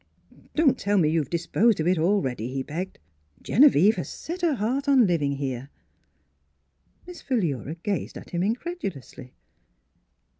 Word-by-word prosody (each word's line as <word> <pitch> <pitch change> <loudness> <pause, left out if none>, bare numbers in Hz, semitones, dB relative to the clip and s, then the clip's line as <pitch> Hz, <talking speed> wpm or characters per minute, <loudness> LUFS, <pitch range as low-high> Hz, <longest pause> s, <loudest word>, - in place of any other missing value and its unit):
" - - -25
Don't 305 -4 +3
tell 205 +1 +1
me 160 -5 +3
you 165 - +2
have 145 - -3
disposed 185 +6 +1
of 155 - 0
it 180 -1 +2
already," 135 - 0
he 135 0 -3
begged. 180 +7 -5 0.2
" 75 -1 -35
Genevieve 220 - +5
has - - -4
set 345 +2 -7
her 330 -5 +2
heart 255 +6 -1
on 270 -4 +5
living 155 -6 0
here." 135 -1 -4 1.4
Miss 355 0 -10
Philura 160 - -2
gazed 195 +3 -4
at - - -12
him 175 - -1
incredu 245 - -2
lously. 130 -1 -12
185 Hz, 160 wpm, -25 LUFS, -, 1.4 s, Genevieve